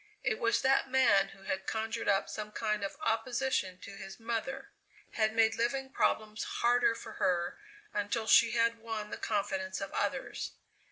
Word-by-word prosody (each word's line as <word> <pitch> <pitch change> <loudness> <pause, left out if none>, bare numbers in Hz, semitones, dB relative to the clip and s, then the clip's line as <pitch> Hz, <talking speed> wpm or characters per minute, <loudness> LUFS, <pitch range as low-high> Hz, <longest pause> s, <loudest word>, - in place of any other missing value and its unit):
It 215 - 0
was 230 0 +2
that 265 0 +3
man 230 -7 +5
who 195 0 -15
had 190 0 -3
conjured 225 +1 -2
up 195 -1 +3
some 210 0 -5
kind 215 -1 -1
of 195 - -4
opposition 225 -4 0
to - - -9
his 195 +1 -9
mother 235 - -3 0.4
had 220 -1 +1
made 220 -1 +4
living 265 +4 -1
problems 215 -3 0
harder 240 -1 +2
for 220 - -8
her 175 -1 +1 0.3
until 210 +2 -1
she 230 +1 +7
had 230 0 +2
won 220 -2 -5
the - - -4
confidence 195 -2 -1
of 195 - -5
others. - - -2
220 Hz, 165 wpm, -32 LUFS, 200-235 Hz, 0.4 s, she